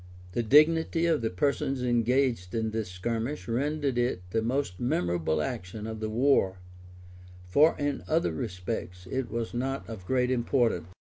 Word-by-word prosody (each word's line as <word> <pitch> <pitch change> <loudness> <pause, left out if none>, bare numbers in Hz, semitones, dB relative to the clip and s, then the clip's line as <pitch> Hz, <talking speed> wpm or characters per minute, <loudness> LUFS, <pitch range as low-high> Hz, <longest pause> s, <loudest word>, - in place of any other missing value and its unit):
The 120 - 0
dignity 160 +6 +4
of 165 -5 +2
the 115 - 0
persons 135 +6 0
engaged 120 -4 +1
in 110 -1 0
this 110 -3 -3
skirmish 115 +9 -3
rendered 140 +2 0
it 120 -7 0
the 110 - +1
most 120 -5 -1
memorable 85 - 0
action 95 +7 -5
of 110 0 -5
the 110 0 -2
war; 110 -5 +2 0.9
for 150 - +5
in 145 -1 -2
other 160 - +2
respects 90 -1 -5
it 130 -2 -2
was 115 -1 -3
not 135 +3 -2
of 95 -5 -8
great 125 -1 +2
importance. 120 - +1
120 Hz, 150 wpm, -28 LUFS, 100-135 Hz, 0.9 s, for